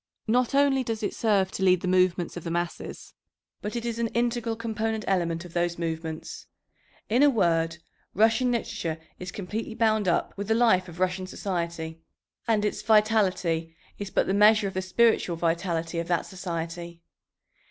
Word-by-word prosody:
Not 245 +3 +1
only 275 -2 +4
does 225 -2 -3
it - - -1
serve 200 -4 +1
to 190 - -3
lead 185 -2 +4
the - - -3
movements 180 -1 +2
of 175 - -6
the 170 - -4
masses, 175 +1 -4 0.5
but 210 +3 -4
it 235 0 -3
is 235 -1 -3
an 230 - +1
integral 235 0 -1
component 220 -1 -2
element 170 -2 0
of 170 - -12
those 175 0 0
movements. 160 -1 -5 0.6
In 240 +5 +2
a 290 - +7
word, 165 - +1 0.4
Russian 225 +5 +3
literature 170 -8 -2 0.2
is 180 0 -6
completely 215 +3 -5
bound 220 -3 +2
up 175 - +1
with 200 0 -5
the 220 - +2
life 220 -6 +3
of 175 +1 -11
Russian 185 0 0
society, 170 -4 -4 0.5
and 215 -2 +2
its 210 - -2
vitality 190 -7 +2 0.2
is 200 -1 -4
but - - +1
the 190 - 0
measure 210 0 +5
of 195 - -5
the 185 - -1
spiritual 185 -1 +2
vitality 165 0 -1
of 170 - -3
that 175 -1 0
society. 170 -2 -6
190 Hz, 175 wpm, -27 LUFS, 170-220 Hz, 0.6 s, a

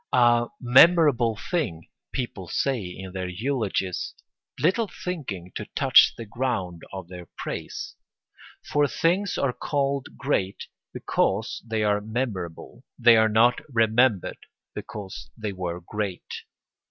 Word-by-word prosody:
A 120 0 +5
memorable 125 -3 +5 0.2
thing, 115 - -1 0.2
people 120 -8 -4
say 135 +6 0
in 95 +1 -8
their 95 -1 -4
eulogies, 100 -2 -2 0.4
little 200 +8 +2
thinking 125 - -6
to - - -5
touch - - +6
the 115 - -6
ground 105 -7 -2
of 95 -3 -7
their 90 -1 -10
praise. - - -5 0.7
For 145 0 +2
things 180 +6 +1
are 135 -3 +1
called 140 -1 -2
great 100 -9 -1 0.3
because 105 +4 -1
they 110 -2 -1
are 105 0 +2
memorable, 110 -1 -4
they 120 -2 +7
are 110 0 +4
not 115 +3 +4
remembered 115 -3 +2 0.3
because 95 - -7
they 105 -2 -4
were 90 -2 -4
great. 100 +1 -5
110 Hz, 120 wpm, -25 LUFS, 95-130 Hz, 0.7 s, they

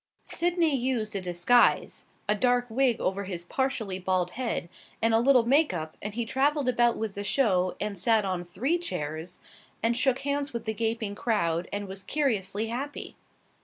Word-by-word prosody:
Sydney 340 -3 +1
used 240 -5 -1
a 195 - -1
disguise 180 +7 +2 0.2
a 210 - +4
dark 245 +3 +2
wig 245 -1 +2
over 195 +2 -1
his 180 -3 -4
partially 220 -3 -2
bald 185 -1 0
head 240 -7 -2 0.3
and 225 0 +2
a 225 - +5
little 250 -1 +5
make 280 - +3
up 155 -1 -5
and 210 0 -5
he 235 -1 -1
traveled 280 +3 +1
about 240 -1 +3
with 220 -2 -3
the 200 - -5
show 190 -6 +2
and 210 -1 -2
sat 215 +3 +2
on 185 -2 -2
three 235 - -1
chairs, 160 - -5 0.4
and 230 +1 +2
shook 260 0 +2
hands 280 -1 -2
with 235 -1 -4
the 220 - -1
gaping 225 -1 -2
crowd, 175 -7 0
and 205 0 -3
was 190 0 -7
curiously 215 -6 -1
happy. 275 +5 -5
225 Hz, 175 wpm, -28 LUFS, 190-255 Hz, 0.4 s, a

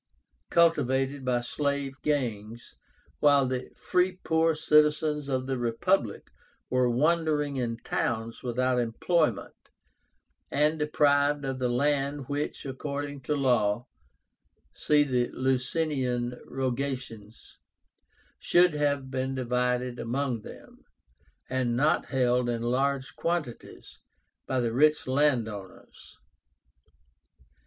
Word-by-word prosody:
cultivated 140 -5 +2
by 125 -1 +1
slave 140 +2 -2
gangs, 120 -6 -3 0.5
while 145 -2 +5
the 130 0 -3
free 180 +1 +1
poor 160 0 +2
citizens 150 -1 +2
of 130 -1 -1
the 130 -1 -2
Republic 120 - 0 0.4
were 125 -1 +3
wandering 150 +1 +1
in 115 -2 -2
towns 115 0 -3
without 125 +1 0
employment, 120 - 0 1.0
and 150 +3 +1
deprived 145 -1 +2
of 135 -1 -3
the 125 -1 0
land 140 +2 0
which, 145 +1 -3
according 140 +1 -5
to 150 +4 -1
law 120 -5 +1 0.9
(see 150 -1 +3
the 125 -3 0
Licinian 130 -2 -1
Rogations), 130 -4 -5 0.8
should 175 -1 +4
have 145 -3 -1
been 130 0 -2
divided 125 -1 -1
among 125 -1 -2
them, - - -13 0.6
and 125 -2 -1
not 150 +4 +2
held 125 -2 +1
in 115 -1 -2
large 135 +2 -1
quantities 165 -8 -4 0.5
by 130 - 0
the 120 -2 -1
rich 150 +4 +3
land 130 -3 +2
owners. 100 -4 -11
130 Hz, 105 wpm, -28 LUFS, 125-145 Hz, 1.0 s, while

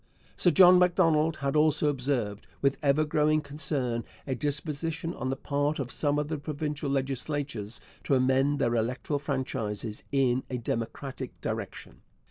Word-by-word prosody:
Sir 180 - +3
John 180 +3 +7
Macdonald 165 -3 +3
had 140 +2 0
also 155 0 +4
observed, 125 -7 -1
with 140 0 +2
ever 145 +1 +3
growing 155 0 +2
concern, 140 -5 -1 0.2
a 135 - -2
disposition 150 +3 -2
on 130 -4 -4
the 135 - 0
part 145 +2 -1
of 130 -3 -4
some 145 +5 +1
of 150 0 -1
the 155 -1 -3
provincial 150 0 -3
legislatures 135 -5 -2 0.3
to 140 - +3
amend 135 +2 +3
their 120 - +1
electoral 125 +5 -1
franchises 115 -6 -3
in 130 -2 +2
a 125 - -2
democratic 115 +3 -4
direction. - - -6
140 Hz, 145 wpm, -28 LUFS, 130-150 Hz, 0.3 s, John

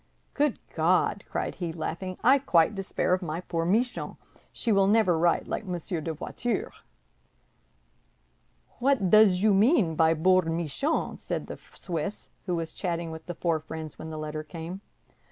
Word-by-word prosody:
"Good 295 -3 +1 0.2
God!" 180 +4 +2
cried - - -2
he, 175 -3 -4
laughing, 175 +3 -4
"I 270 +3 +6
quite 175 -8 +3
despair 195 -2 -1
of 185 - +1
my 165 -2 -3
poor 165 -2 -2
Michon; 235 +7 0 0.3
she 230 - -2
will 195 -2 +4
never 210 -4 +4
write 170 +1 +2
like - - -3
Monsieur 175 -3 -4
de 165 - -3
Voiture." 210 +8 -3 2.1
"What 245 -8 +2
does 210 -3 +6
you 215 -2 +5
mean 205 - +4
by 160 0 +4
boor 185 +3 +4
Michon?" 165 - -1
said - - -3
the - - -8 0.2
Swiss, 175 +3 -5 0.2
who 180 - 0
was 165 -1 -4
chatting 170 -3 -3
with 160 0 -9
the 175 - -5
four 165 -2 0
friends 160 -1 -8
when 160 - -7
the 155 - -6
letter 155 0 -4
came. 165 +4 -7
175 Hz, 160 wpm, -27 LUFS, 160-200 Hz, 2.1 s, I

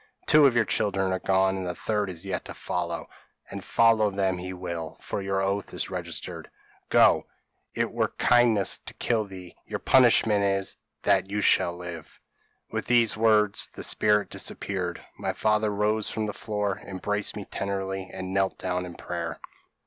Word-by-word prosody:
Two 150 -2 +7
of 125 - +1
your 120 -2 +3
children 95 -1 0
are 95 - -1
gone, 95 0 +1
the 90 -1 -3
third 105 0 -1
is 85 0 -5
yet 95 -2 -3
to - - -8
follow 85 -1 -3 0.4
and 100 -1 -6
follow 115 -2 +4
them 95 -2 -1
he 90 +1 -5
will, 85 -3 -6
for - - -4
your 95 0 -1
oath 100 +1 -2
is - - -3
registered. 85 -4 -5 0.4
Go - - +5 0.5
it - - 0
were - - +1
kindness 115 -5 +4
to - - -10
kill 110 -3 0
thee 95 -3 -11
your - - -3
punishment 115 -5 +4
is, 95 0 0 0.3
that 95 0 +2
you 105 +1 -1 0.3
live!' 85 -2 -8 0.5
"With - - -3
these 120 -2 +3
words 105 -2 +3
the - - -7
spirit 105 -1 +2
disappeared. 90 -3 -3
My - - -2
father 105 0 +1
rose 105 +1 0
from 110 -1 -2
the 105 - -4
floor, 105 -2 -3
embraced 100 +2 -3
me 105 -2 -6
tenderly, 95 -1 -4
and 95 0 -6
knelt 95 -1 +1
down 90 0 -2
in 85 - -10
prayer. 85 -2 -5
95 Hz, 165 wpm, -26 LUFS, 95-105 Hz, 0.5 s, Two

